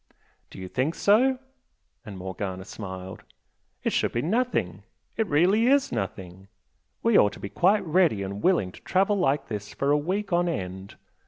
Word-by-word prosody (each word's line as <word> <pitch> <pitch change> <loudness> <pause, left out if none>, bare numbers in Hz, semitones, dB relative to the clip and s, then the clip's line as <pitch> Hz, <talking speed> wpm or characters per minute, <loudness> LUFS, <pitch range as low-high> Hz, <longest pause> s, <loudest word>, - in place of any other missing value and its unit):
"Do - - -13
you 95 -1 -6
think 130 - -1
so?" 255 +6 +3 0.7
and 105 -5 -9
Morgana 95 0 -5
smiled 95 -3 -8 0.6
"It - - 0
should - - 0
be 120 - -1
nothing 175 - -1 0.3
it 225 -2 0
really 190 +10 +3
is 275 +1 +3
nothing! 95 0 -5 0.6
We 230 -2 +5
ought 105 - +3
to - - -11
be 100 - -6
quite 195 - +2
ready 160 - +2
and 100 +1 -5
willing 170 - +2
to - - -15
travel 195 +2 +1
like 140 -5 +1
this 105 -3 -6
for 140 +1 0
a 145 - +4
week 190 +5 -2
on 175 0 +2
end! 95 - -5
140 Hz, 170 wpm, -26 LUFS, -, 0.7 s, We